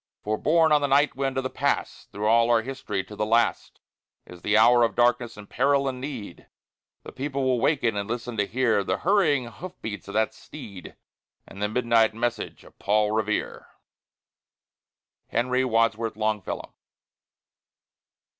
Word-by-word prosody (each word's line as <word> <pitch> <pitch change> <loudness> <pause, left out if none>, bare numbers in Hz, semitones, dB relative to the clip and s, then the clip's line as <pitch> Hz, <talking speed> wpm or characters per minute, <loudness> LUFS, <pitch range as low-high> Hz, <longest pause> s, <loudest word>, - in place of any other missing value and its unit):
For, 105 +1 0
borne 160 +6 +3
on 150 -1 +5
the 145 - +1
night 140 +2 +3
wind 135 0 -2
of 130 - 0
the 130 - -3
Past, - - -2
Through 105 +1 -4
all 115 +2 +4
our 115 -1 +3
history, 110 -6 -4
to 105 - -11
the 105 - -2
last, 115 +2 0 0.5
In 90 - -12
the 105 +4 +1
hour 120 +2 +6
of 115 - +2
darkness 120 -1 +1
and 105 -1 -11
peril 140 +2 +1
and 130 -1 -4
need, 125 -10 -7 0.6
The - - -9
people 140 0 -3
will 130 -2 +1
waken 120 -8 +1
and 100 +1 -3
listen 120 0 -4
to 100 - +1
hear 115 -4 +1
The - - -1
hurrying 160 -9 +2
hoof 180 +10 -10
beats 105 -5 -6
of 100 - -8
that 110 0 +1
steed, 110 -11 -11 0.5
And 100 - -12
the 105 - 0
midnight 115 -1 +2
message 120 -1 -3
of - - -19
Paul 105 +1 +2
Revere. 110 -1 -2 1.6
HENRY 125 +2 0
WADSWORTH 115 -2 0
LONGFELLOW. 110 -3 -3
115 Hz, 165 wpm, -25 LUFS, 110-130 Hz, 1.6 s, hour